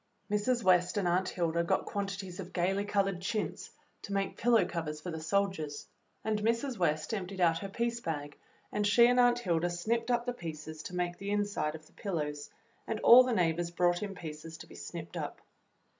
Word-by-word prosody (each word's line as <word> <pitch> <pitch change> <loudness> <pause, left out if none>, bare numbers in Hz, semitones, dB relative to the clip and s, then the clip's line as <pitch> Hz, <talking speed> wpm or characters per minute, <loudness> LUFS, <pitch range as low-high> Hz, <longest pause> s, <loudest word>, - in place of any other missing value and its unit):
Mrs. 230 +4 +1
W^est 180 0 +4
and 195 -3 +1
Aunt 185 +2 +2
Hilda 170 -1 0
got 170 - +1
quantities 195 -2 -4
of 185 -1 -7
gayly 195 +3 +1
colored 195 -3 0
chintz 210 +3 -3 0.3
to 200 - -6
make 195 -1 -1
pillow 235 -2 +4
covers 155 -3 -4
for 175 +3 -6
the 160 -1 -5
soldiers, 165 -4 -1 0.4
and 215 -1 0
Mrs. 230 +3 0
W^est 155 +1 0
emptied 190 -1 -5
out 165 -2 +3
her 195 - -5
piece 235 +3 -1
bag, 150 -7 -4 0.4
and 210 0 +1
she 235 +4 +7
and 245 +1 +4
Aunt 245 -1 +5
Hilda 175 -6 0
snipped 225 +7 -1
up 240 -1 +1
the 245 - -1
pieces 155 -5 -7
to 180 - -7
make 175 -1 -2
the 195 - -4
inside 205 -7 0
of 155 -1 -11
the - - -22
pillows, 150 -7 -3 0.4
and 220 - -2
all 245 +2 +10
the 255 - -1
neighbors 175 -4 +1
brought 175 0 +2
in 200 -2 -4
pieces 160 -1 -8
to - - -10
be - - -15
snipped - - -7
up. - - -4
185 Hz, 200 wpm, -31 LUFS, 165-210 Hz, 0.4 s, all